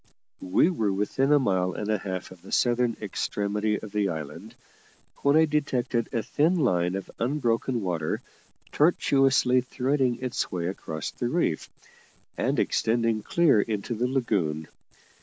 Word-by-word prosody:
We 165 - +4
were 110 - 0
within 105 +8 0
a 150 - +7
mile 95 -8 +1
and 105 - -4
a 110 -1 +1
half 95 -1 -5
of 95 -2 -13
the - - -13
southern 120 -1 +2
extremity 105 +1 -1
of 105 - -9
the 105 -1 0
island, 80 -4 -7 0.6
when 140 +1 +2
I 160 - +6
detected 130 -6 -1
a 115 -3 -1
thin 160 - +2
line 90 - +1
of 95 - -6
unbroken 120 -1 0
water 85 -5 -2 0.5
tortuously 135 -5 +3
threading 130 0 0
its 130 -1 -3
way 85 -2 -2
across 80 -4 -4
the 120 - -3
reef, 155 - 0 0.7
and - - 0
extending 115 -1 +1
clear 145 -3 +3
into 105 +2 -3
the 120 +2 0
lagoon. 95 - -1
115 Hz, 145 wpm, -26 LUFS, 95-130 Hz, 0.7 s, a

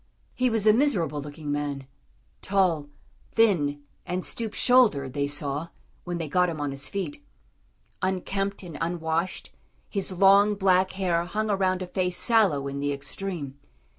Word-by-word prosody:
He 255 0 +1
was 225 -2 +1
a 215 - +7
miserable 180 - +1
looking 145 +1 -6
man 145 -2 -3 0.6
tall, 180 -7 +1 0.4
thin, 150 -11 +2 0.2
and 180 +1 -3
stoop 225 -3 -2
shouldered 210 - +3
they 140 0 0
saw, 145 +2 -1 0.4
when 175 -1 -3
they 165 -2 -3
got 180 +4 +2
him 160 -2 -5
on 145 -1 -2
his 135 +1 -5
feet. 290 +10 -4 0.8
Unkempt 195 +1 -2
and 165 -5 -8
unwashed, 165 +1 -2 0.4
his 195 -2 -2
long, 200 +3 +5
black 190 -1 +3
hair 175 -3 0
hung 215 +4 -2
around 185 -2 +1
a - - -4
face 180 0 -1
sallow 195 - +2
in 140 0 -4
the 145 0 -1
extreme. 140 0 -5
180 Hz, 150 wpm, -26 LUFS, 145-195 Hz, 0.8 s, a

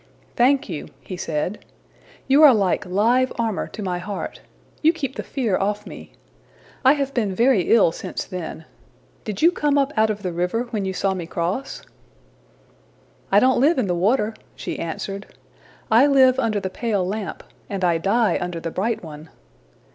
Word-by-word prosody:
``Thank 265 +3 +3
you,'' 165 -7 -6
he 185 - -7
said. 175 +2 -3 0.6
``You 275 +3 +5
are 290 -6 +9
like 195 -3 0
live 235 +8 +2
armor 225 -4 -1
to 215 - -8
my 180 -2 -2
heart; 200 +2 -6 0.4
you 320 - +5
keep 280 -5 -4
the - - -3
fear 235 -8 -1
off 210 +2 -1
me. - - -11 0.7
I 265 +1 +7
have 275 -2 -2
been 210 -7 -1
very 235 -5 +3
ill 220 -7 +5
since - - -5
then. 170 -3 -7 0.6
Did 210 +2 -4
you 340 - +7
come 295 -5 +1
up 280 +1 +1
out 220 0 +3
of 210 -1 -3
the 180 - -2
river 180 +7 -1
when 210 -4 -2
you 190 - -2
saw 195 +1 0
me 175 -3 -5
cross?'' 180 +9 -3 1.5
``I 200 - +6
don't 255 -1 +3
live 310 +5 +4
in 255 - +1
the 180 - 0
water,'' 210 +5 +1 0.2
she - - -5
answered. 195 +4 -6 0.6
``I 255 +6 +6
live 260 -2 +5
under 215 -2 +1
the 190 -1 -4
pale 210 -5 -1
lamp, 205 +2 -4 0.3
and 195 -2 -3
I 170 -2 +2
die 215 +6 +2
under 180 -1 -3
the 165 0 -5
bright 220 +5 -2
one.'' 155 0 -10
210 Hz, 175 wpm, -22 LUFS, 185-255 Hz, 1.5 s, are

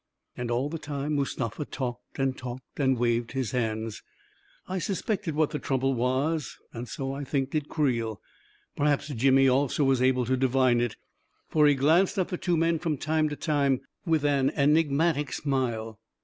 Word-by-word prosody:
And 120 -1 -4
all 120 +4 0
the 165 +2 -5
time 145 0 -3
Mustafa 135 -2 -2
talked 125 -3 -6
and 135 -1 0
talked 130 +2 -9
and 130 -2 +3
waved 120 0 0
his 130 -5 -2
hands... 110 -3 -2 0.7
I 185 0 -2
suspected 195 -3 -2
what 155 -1 +2
the 150 - -3
trouble 135 0 0
was, 130 +5 -1 0.2
and 120 0 -6
so, 135 0 -4
I 140 +1 -5
think, 135 -1 -1
did 150 -2 -2
Creel. 115 - 0 0.6
Perhaps 145 0 +1
Jimmy 135 +1 +4
also 135 +2 +2
was 135 -2 +3
able 130 -1 +3
to 130 +2 +1
divine 130 -2 +3
it, 120 -2 -1 0.5
for 150 -1 +4
he 145 - +5
glanced 160 +9 +3
at 185 - 0
the 180 - -3
two 175 -2 +1
men 165 0 +2
from 155 -3 -1
time 155 +2 +1
to 145 - -4
time 140 -4 +1 0.2
with 160 -4 +1
an 140 -2 +3
enigmatic 150 0 +2
smile. 120 -6 -2
135 Hz, 175 wpm, -27 LUFS, 125-150 Hz, 0.7 s, he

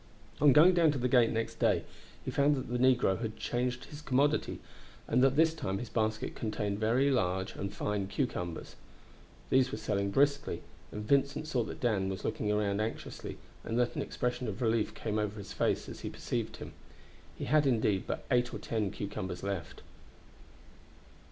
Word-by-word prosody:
On 145 -1 +7
going 160 +8 +7
down 170 -3 +5
to - - -2
the 125 0 +1
gate 120 -2 +5
next 115 0 -3
day - - +3 0.4
he - - -2
found 145 +1 +3
that 130 - -5
the 120 0 -1
negro 125 -6 +3
had 110 -2 -4
changed 125 +1 -2
his 150 0 -10
commodity, 145 +1 +1 0.5
and - - +3
that 135 0 +4
this 160 +1 +4
time 95 -12 -3
his 120 +2 -6
basket 110 -1 -1
contained 105 -2 -2
very 120 +6 +3
large 95 -6 0
and 100 0 -4
fine 105 -1 -2
cucumbers. 90 - -3 0.8
These 130 0 +4
were - - -3
selling 100 -2 -1
briskly, 140 - +1 0.3
and 105 0 -5
Vincent 140 +3 +2
saw 130 -6 0
that - - -7
Dan 105 -6 +1
was 95 0 -5
looking 105 - -1
round 105 -1 +1
anxiously, 110 +1 -5 0.3
and 115 - -2
that 120 -1 +1
an - - -1
expression 125 0 -2
of 100 -2 -4
relief 115 -2 +1
came 110 -1 -2
over 105 0 -2
his 100 - -7
face - - 0
as - - -8
he - - -4
perceived - - -3
him. - - -8 0.6
He - - -4
had, 150 +1 +3
indeed, 110 -6 +2
but - - -3
eight 120 -1 +3
or - - -5
ten 110 -3 -1
cucumbers 95 -2 -5
left. 100 -6 -4
115 Hz, 185 wpm, -31 LUFS, 105-130 Hz, 0.8 s, On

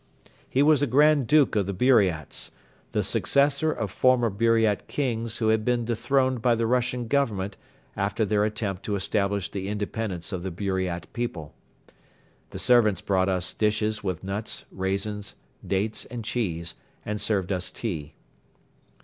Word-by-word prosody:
He 135 - +3
was 150 -2 +5
a 145 - +2
Grand 145 +1 +4
Duke 150 -4 +4
of 100 -3 +1
the 100 - -3
Buriats, 95 - +2 0.4
the - - 0
successor 140 +2 +2
of 105 -9 -3
former 120 0 +3
Buriat 110 0 +2
kings 115 -5 -2
who 110 -2 +1
had 110 0 +2
been 120 0 +1
dethroned 125 +2 +1
by 120 0 +3
the 115 0 0
Russian 125 0 0
Government 105 -8 0 0.4
after 100 +3 0
their 105 0 +2
attempt 105 -3 -2
to 105 - -1
establish 100 0 -1
the 95 -1 -4
Independence 105 -3 -3
of 95 -3 -3
the 95 - -3
Buriat 95 -2 -2
people. 90 -11 -4 1.0
The - - -7
servants 115 -5 +4
brought 95 -1 +1
us 90 -1 -1
dishes 105 0 0
with 90 -3 -3
nuts, 100 +3 -4
raisins, 100 +2 -3 0.3
dates 100 +3 -1
and 115 -2 -7
cheese 85 -9 -2 0.3
and 105 0 -3
served 100 -3 0
us 90 -1 -1
tea. 80 -10 -5
105 Hz, 150 wpm, -26 LUFS, 95-120 Hz, 1.0 s, was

